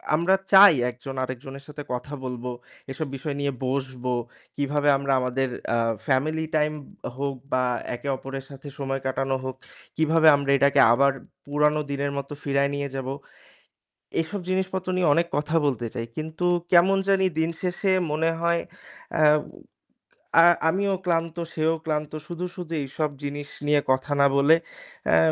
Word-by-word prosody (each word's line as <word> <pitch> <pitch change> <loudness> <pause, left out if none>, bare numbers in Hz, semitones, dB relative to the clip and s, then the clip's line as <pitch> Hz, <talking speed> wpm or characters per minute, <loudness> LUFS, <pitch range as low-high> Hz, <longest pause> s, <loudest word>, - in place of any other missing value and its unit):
আমরা 175 +4 +3 0.2
চাই 195 -2 +10 0.2
একজন 135 +2 -9
আরেকজনের 135 +2 -7
সাথে 150 0 -8
কথা 140 +4 -5
বলব, 125 -1 -5 0.5
এসব 145 +2 -4
বিষয় 140 +1 -4
নিয়ে 140 0 0
বসবো। 130 -1 -2 0.4
কিভাবে 145 +1 +1
আমরা 140 0 0
আমাদের 125 +1 -1 0.2
অ্যা 115 - +2 0.3
ফ্যামিলি 155 +4 +1
টাইম 150 0 +2 0.4
হোক 140 -1 -2 0.2
বা 130 0 +2 0.3
একে 140 - -8
অপরের 135 0 -7
সাথে 140 +1 -11
সময় 135 -1 -2
কাটানো 135 0 0
হোক, 130 0 -4 0.4
কিভাবে 160 0 +4
আমরা 140 -1 -1
এটাকে 140 +1 +3
আবার 140 +2 +4 0.3
পুরানো 150 +1 +2
দিনের 140 0 -1
মত 140 0 -4
ফিরায়ে 140 0 +1
নিয়ে 140 0 -3
যাব, 130 -1 -4 1.1
এসব 180 +5 -5
জিনিসপত্র 190 0 -1
নিয়ে 175 -5 +3
অনেক 170 +2 +2
কথা 150 +2 -1
বলতে 120 -4 0
চাই। 115 - -3
কিন্তু 160 +3 -3 0.3
কেমন 185 +3 +6
জানি 195 -1 +3
দিনশেষে 175 +4 -1 0.2
মনে 160 +2 +1
হয় 170 0 +1 0.5
অ্যা 155 - +4 1.2
আ - - +8 0.2
আমিও 195 +3 +1
ক্লান্ত, 165 -1 0 0.2
সেও 160 +1 +1
ক্লান্ত। 150 -1 -2 0.2
শুধু, 175 +1 -4
শুধু 170 -2 -6
এইসব 150 +3 -2
জিনিস 145 0 -4 0.2
নিয়ে 145 -1 +4
কথা 130 +3 0
না 140 - +6
বলে 145 +4 +6 0.5
অ্যা 80 - +5
145 Hz, 150 wpm, -25 LUFS, 135-165 Hz, 1.2 s, চাই